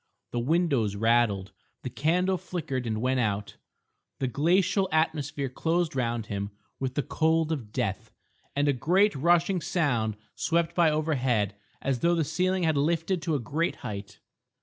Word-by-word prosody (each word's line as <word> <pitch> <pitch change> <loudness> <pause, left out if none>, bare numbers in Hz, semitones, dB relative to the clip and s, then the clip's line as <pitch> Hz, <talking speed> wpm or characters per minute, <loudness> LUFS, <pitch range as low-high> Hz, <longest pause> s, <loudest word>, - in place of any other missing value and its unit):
The 120 - -1
windows 135 - +1
rattled. 110 -3 +2 0.3
The 125 - -4
candle 180 +5 +1
flickered 135 -8 -4
and 110 -1 -2
went 130 +1 +1
out. 105 -3 -1 0.6
The 130 - -1
glacial 180 - +2
atmosphere 150 -3 0
closed 165 +4 -1
round 120 -3 -1
him 100 -1 -3 0.3
with 130 -1 -3
the 145 - 0
cold 160 0 +1
of 125 -9 -4
death, - - -2 0.5
and 145 +1 +2
a 145 - +4
great 185 - +3
rushing 170 +5 +2
sound 120 - 0 0.2
swept 170 0 0
by 170 -2 +4
overhead 130 -10 +1 0.3
as 135 -2 0
though 170 +4 +3
the 165 - +2
ceiling 180 +5 0
had 160 -3 +2
lifted 165 +4 +1
to 160 -1 0
a - - 0
great 150 +7 -1
height. 100 -1 -6
145 Hz, 155 wpm, -27 LUFS, 120-170 Hz, 0.6 s, a